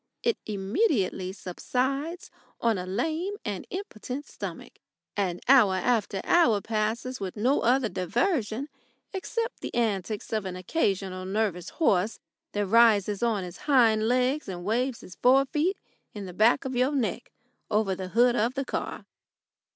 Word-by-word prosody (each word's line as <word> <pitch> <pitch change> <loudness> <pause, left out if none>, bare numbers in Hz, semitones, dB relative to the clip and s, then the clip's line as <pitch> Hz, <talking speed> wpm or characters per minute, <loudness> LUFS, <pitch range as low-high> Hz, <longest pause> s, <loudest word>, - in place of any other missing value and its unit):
It 470 0 +1
immediately 200 - 0
subsides 265 - -3 0.3
on 225 -4 +1
a 180 - -5
lame 320 - -1
and 205 -4 -4
impotent 285 - -6
stomach, - - -8 0.4
and 185 -4 -1
hour 240 -8 +6
after 205 -1 0
hour 290 -12 +4
passes 225 +5 -2
with 195 +1 -5
no 255 +7 +2
other 250 +1 +3
diversion 225 - -1 0.5
except 460 +5 -3
the - - -5
antics 215 -2 -1
of 215 -2 -1
an 185 -1 -4
occasional 185 - -1
nervous 190 -3 -1
horse 210 - +1 0.3
that 205 0 0
rises 210 -2 +4
on 225 -5 +1
his 175 -1 -8
hind 225 -5 +5
legs 255 +2 +1
and 175 -1 -6
waves 240 +4 0
his 180 - -12
forefeet 275 +8 +3 0.4
in 205 -2 -5
the 180 - -8
back 225 +8 +3
of 260 -1 -3
your 255 +4 +2
neck 255 -5 -2 0.4
over 210 -2 +1
the 185 0 -5
hood 240 +5 +4
of 240 +3 +1
the 275 0 -2
motor. - - -3
225 Hz, 145 wpm, -27 LUFS, 195-265 Hz, 0.5 s, hour